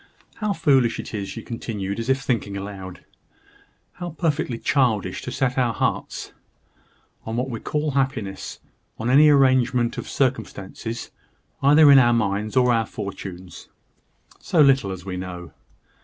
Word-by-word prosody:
How 215 -2 -1
foolish 135 -10 +2
it - - -7
is," 100 -2 -4
she 115 - -7
continued, 105 -4 -4
as 115 +2 -4
if 135 0 +2
thinking 115 -6 -2
aloud, 95 -2 -8 0.9
"how 175 -1 -6
perfectly 150 -7 -1
childish 120 -7 0
to - - -6
set 130 -1 0
our 120 -3 +1
hearts - - -2 0.9
on 110 - -5
what 130 +1 -2
we 115 - -4
call 150 0 -2
happiness, 130 -8 -2 0.4
on 115 +3 -1
any 150 +3 +7
arrangement 130 -4 +3
of - - -7
circumstances, 115 -3 -3 0.5
either 145 +1 +7
in 140 - +9
our 120 -2 +4
minds 105 0 -1
or 125 -1 +4
our 115 -1 +1
fortunes 95 -3 -8 0.7
so 170 - -1
little 135 -8 +5
as 95 -1 -7
we 95 -1 -4
know! 90 -2 -7
120 Hz, 145 wpm, -23 LUFS, 100-135 Hz, 0.9 s, in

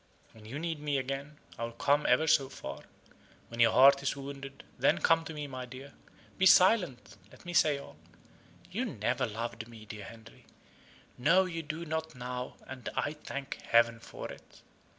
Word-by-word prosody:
When 110 -1 -16
you 120 +6 -6
need 165 -1 -3
me 145 -1 -1
again, 135 +3 -4 0.2
I - - -2
will 115 0 -4
come 145 +5 +2
ever 125 +6 +4
so 140 -4 +3
far. - - -8 0.6
When 115 - -8
your 115 -1 +6
heart 140 +1 +7
is 140 - -1
wounded, 140 0 -8 0.2
then - - +4
come 165 0 +3
to 160 - -6
me, 150 -1 -4
my 130 -2 -6
dear. 135 +3 -10 0.5
Be 190 - +6
silent! 180 - +4
let - - -17
me 175 - -5
say 155 -4 +4
all. 140 - -11 0.7
You 220 +8 -1
never 125 - -1
loved 115 +1 -5
me, 115 -2 -12
dear 105 -2 -8
Henry 110 +1 -14 0.7
no, 180 +9 +5
you 165 -2 -4
do 160 +2 -5
not 160 -1 -3
now, 125 0 -5
and 130 -2 -7
I 145 - 0
thank 140 -2 -7
heaven 115 0 +3
for - - -8
it. - - -15
135 Hz, 180 wpm, -31 LUFS, 120-155 Hz, 0.7 s, heart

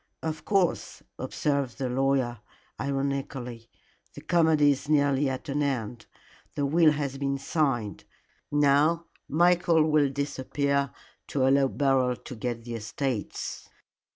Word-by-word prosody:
"Of 160 -1 -4
course," 195 -4 0 0.2
observed 140 -4 -1
the 135 -2 -2
lawyer, 130 -2 0 0.4
ironically, 135 -4 -3 0.5
"the 145 - -9
comedy 160 -3 +4
is 140 +2 -4
nearly 140 -2 +3
at 130 +2 -5
an 145 +1 -1
end. 120 -5 -2 0.5
The 145 - 0
will 155 +2 +4
has 140 -2 -3
been 140 0 -1
signed. 135 - -1 0.5
Now 145 +3 +3 0.2
Michael 170 0 +4
will 150 -2 +4
disappear 140 0 -1 0.4
to 130 -2 +1
allow 135 0 +4
Beryl 135 -2 +1
to 125 - -10
get 115 0 -4
the 120 0 -6
estates." 115 +1 -4
140 Hz, 125 wpm, -27 LUFS, 130-150 Hz, 0.5 s, comedy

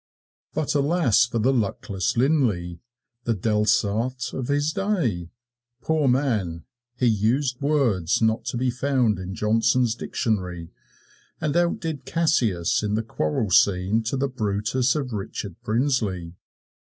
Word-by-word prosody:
But 155 - 0
alas 145 - +3
for 120 - -3
the 125 +5 +2
luckless 105 -4 -1
Linlay, 115 - +1 0.5
the 115 - +1
Delsarte 110 +4 0
of 130 -2 -4
his 145 +2 +1
day, 155 - -1 0.5
poor 155 -1 +1
man! 110 - 0 0.3
he 125 - +1
used 120 +5 +1
words 120 - +1
not 110 0 +1
to - - -3
be 125 +1 +1
found 125 -5 +1
in 95 +1 -6
Johnson's 115 +2 +2
Dictionary, 90 -8 -3 0.7
and 150 -1 -1
outdid 165 -5 -1
Cassius 120 - +1
in 105 -1 -1
the 110 - -1
quarrel 95 -1 -2
scene 95 +4 +3
to 125 +5 -1
the 140 +1 0
Brutus 115 +1 0
of 135 -5 -3
Richard 100 -2 -5
Brinsley. 110 -8 -1
115 Hz, 130 wpm, -24 LUFS, 100-135 Hz, 0.7 s, alas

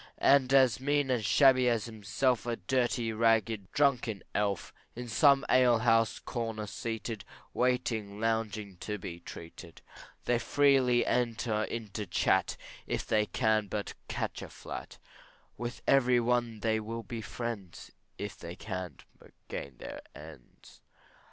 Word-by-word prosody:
As 135 -3 +5
mean 145 0 +1
and 120 -3 +1
shabby 130 +2 +5
as 115 -3 0
himself, 115 +2 -1
A 120 - 0
dirty, 120 -2 0
ragged, 110 -3 +1
drunken 125 -8 +1
elf, 100 -2 -1 0.2
In 120 +1 -6
some 140 +4 +4
alehouse 115 -3 +4
corner 115 -3 -4
seated, 110 -1 -5 0.3
Waiting 115 -5 0
longing 110 -3 -1
to 105 +3 -4
be 85 -3 -7
treated. 85 0 -11 0.4
They 120 -1 +2
freely 130 -1 +3
enter 115 -3 0
into 105 -2 -5
chat, 90 - +1 0.3
If - - -2
they 105 -1 +2
can 110 -3 +1
but 105 +1 -4
catch - - -3
a - - -7
flat; - - -8 0.6
With 120 +1 -6
every 125 -3 +4
one 120 -2 0
they 110 0 +1
will 115 +1 -5
be 115 +2 -6
friends, 105 -4 -6 0.3
If 105 0 -6
they 85 +1 -7
can 95 -3 -6 0.2
but - - -18 0.2
gain 70 -3 -6
their - - -8
ends. 75 -4 -14
115 Hz, 130 wpm, -31 LUFS, 105-125 Hz, 0.6 s, As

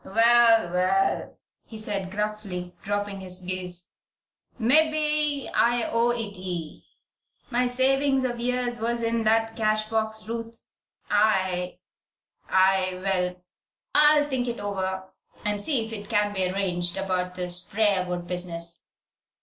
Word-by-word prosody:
"Well, 230 -3 +5
well!" 190 +2 +1 0.3
he 220 - -9
said, 200 -3 -3
gruffly, 205 -3 -4
dropping 205 0 -2
his 185 -1 -4
gaze. 180 -1 -6 0.7
"Mebbe 300 +2 +2
I 240 0 +3
owe 230 +1 +3
it 225 -4 -2
ye. 175 -4 -5 0.7
My 250 +1 +2
savin's 270 +2 +2
of 240 -2 -2
years 245 -1 -1
was 235 +1 0
in 230 0 0
that 225 +1 +2
cash 215 -1 +1
box, 220 -1 -2
Ruth. 230 0 -6 0.5
I 190 -4 +2 0.7
I 185 -1 +3
Well, 180 -2 -1 0.5
I'll 300 0 +5
think 260 -3 -1
it 235 - -3
over 190 -2 -3 0.3
and 210 -1 -1
see 240 -1 0
if 225 - -8
it 205 -2 -7
can 210 -2 +1
be 190 -2 0
arranged 180 -2 -1
about 185 -1 -2
this 180 -1 -3
Briarwood 185 -4 0
business. 170 -1 -4
210 Hz, 125 wpm, -26 LUFS, 185-235 Hz, 0.7 s, Well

